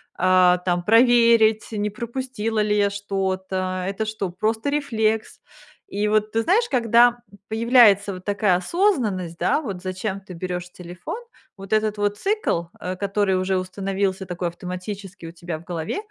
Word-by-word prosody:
а, 185 Hz, 0 st, +4 dB
там, 180 Hz, -1 st, -1 dB
проверить, 230 Hz, 0 st, +4 dB
не 210 Hz, -1 st, -1 dB
пропустила 235 Hz, -1 st, -4 dB
ли 210 Hz, 0 st, +1 dB
я 200 Hz, -1 st, +3 dB
что-то? 190 Hz, -2 st, -2 dB
Это 200 Hz, +3 st, -2 dB
что, 215 Hz, -3 st, -3 dB
просто 220 Hz, +7 st, -1 dB
рефлекс?". 225 Hz, -7 st, -1 dB, 0.5 s
И 205 Hz, +1 st, -1 dB
вот 215 Hz, 0 st, +1 dB
ты 225 Hz, 0 st, 0 dB
знаешь, 455 Hz, -, +2 dB
когда 240 Hz, 0 st, +4 dB, 0.3 s
появляется 220 Hz, -3 st, +4 dB
вот 185 Hz, 0 st, -9 dB
такая 205 Hz, -2 st, +2 dB
осознанность, 205 Hz, -, 0 dB
да, -, -, +2 dB
вот 195 Hz, -, -6 dB
зачем 190 Hz, +1 st, -4 dB
ты 190 Hz, -1 st, -11 dB
берёшь 180 Hz, 0 st, -5 dB
телефон, 180 Hz, -, -7 dB, 0.4 s
вот 195 Hz, +1 st, -6 dB
этот 215 Hz, -1 st, +1 dB
вот 205 Hz, 0 st, 0 dB
цикл, 410 Hz, -, 0 dB
э, 185 Hz, +1 st, -4 dB
который 200 Hz, 0 st, 0 dB
уже 185 Hz, 0 st, 0 dB
установился 190 Hz, +1 st, -2 dB
такой 175 Hz, 0 st, -3 dB
автоматически 185 Hz, +1 st, -7 dB
у 165 Hz, -, -7 dB
тебя 175 Hz, -1 st, -6 dB
в -, -, -16 dB
голове, 165 Hz, -, -4 dB
200 Hz, 155 wpm, -23 LUFS, 185-220 Hz, 0.5 s, а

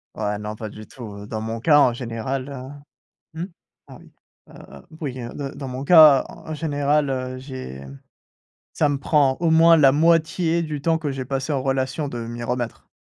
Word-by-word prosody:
Ouais, 105 Hz, 0 st, -2 dB
non 105 Hz, +1 st, -6 dB
pas 110 Hz, -1 st, -6 dB
du 110 Hz, +1 st, -11 dB
tout, 125 Hz, -, -12 dB, 0.2 s
heu, -, -, -11 dB
dans 110 Hz, -1 st, -4 dB
mon 115 Hz, +1 st, -4 dB
cas 150 Hz, +4 st, +4 dB
en 125 Hz, -, +5 dB
général, 125 Hz, +3 st, -4 dB
heu 140 Hz, +1 st, -9 dB, 0.6 s
mmh, -, -, -2 dB, 0.5 s
oui. -, -, -18 dB, 0.4 s
Heu, -, -, -14 dB, 0.2 s
oui 130 Hz, -4 st, -4 dB
heu 120 Hz, 0 st, -7 dB
d 140 Hz, -1 st, -5 dB
dans 135 Hz, -, -6 dB
mon 130 Hz, +2 st, -5 dB
cas 155 Hz, -4 st, +8 dB
en 160 Hz, -, -9 dB
général, 145 Hz, -1 st, 0 dB
heu, 130 Hz, -1 st, -3 dB
j'ai 130 Hz, -, -8 dB, 0.9 s
ça 150 Hz, -, +1 dB
me 145 Hz, -, 0 dB
prend 140 Hz, -1 st, +2 dB
au 165 Hz, -2 st, +2 dB
moins 165 Hz, +1 st, +6 dB
la 135 Hz, -3 st, +6 dB
moitié 165 Hz, +2 st, +2 dB
du 150 Hz, -3 st, -4 dB
temps 165 Hz, +2 st, +1 dB
que 150 Hz, -3 st, -3 dB
j'ai 130 Hz, -1 st, -4 dB
passé 135 Hz, +2 st, -2 dB
en 135 Hz, -2 st, -1 dB
relation 135 Hz, +2 st, -1 dB
de 120 Hz, -, -6 dB
m'y 120 Hz, 0 st, -6 dB
remettre. 120 Hz, -1 st, -4 dB
135 Hz, 195 wpm, -22 LUFS, 125-150 Hz, 0.9 s, cas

